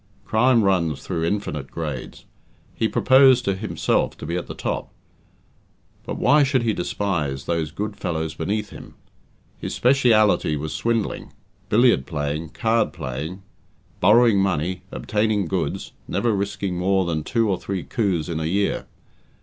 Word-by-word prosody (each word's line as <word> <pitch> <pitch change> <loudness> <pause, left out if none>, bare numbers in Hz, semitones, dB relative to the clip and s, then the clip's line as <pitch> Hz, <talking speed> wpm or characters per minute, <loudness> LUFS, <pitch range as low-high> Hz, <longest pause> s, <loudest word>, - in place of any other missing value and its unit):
Crime 115 +1 +3
runs 85 -7 +1
through 80 0 -2
infinite 75 -8 -3
grades. 75 -6 -6 0.5
He 110 - 0
proposed 130 0 +5
to 100 - +1
himself 105 +3 -1
to - - -8
be 85 - -3
at 90 - -3
the - - -7
top; - - -3 1.2
but - - -3
why 150 +1 +4
should 135 -3 +2
he 115 -2 +1
despise 80 -8 -2
those 85 -2 -1
good 105 +5 -4
fellows 80 -3 -3
beneath 100 +7 -3
him? - - -11 0.6
His - - -4
speciality 115 - +3
was 75 +1 -4
swindling, 115 -2 -2 0.4
billiard 115 - +4
playing, 75 0 -3
card 115 +5 0
playing, 75 +9 -5 0.6
borrowing 110 +2 +5
money, 90 -2 0
obtaining 105 -2 0
goods, 80 - -3 0.2
never 115 -3 0
risking 100 -2 -2
more 95 +1 +2
than 80 -3 -2
two 115 +5 +1
or 95 -3 0
three 95 -3 -4
coups 95 -9 -1
in 80 -2 -3
a 80 - -2
year. 100 +5 0
95 Hz, 145 wpm, -23 LUFS, 80-110 Hz, 1.2 s, proposed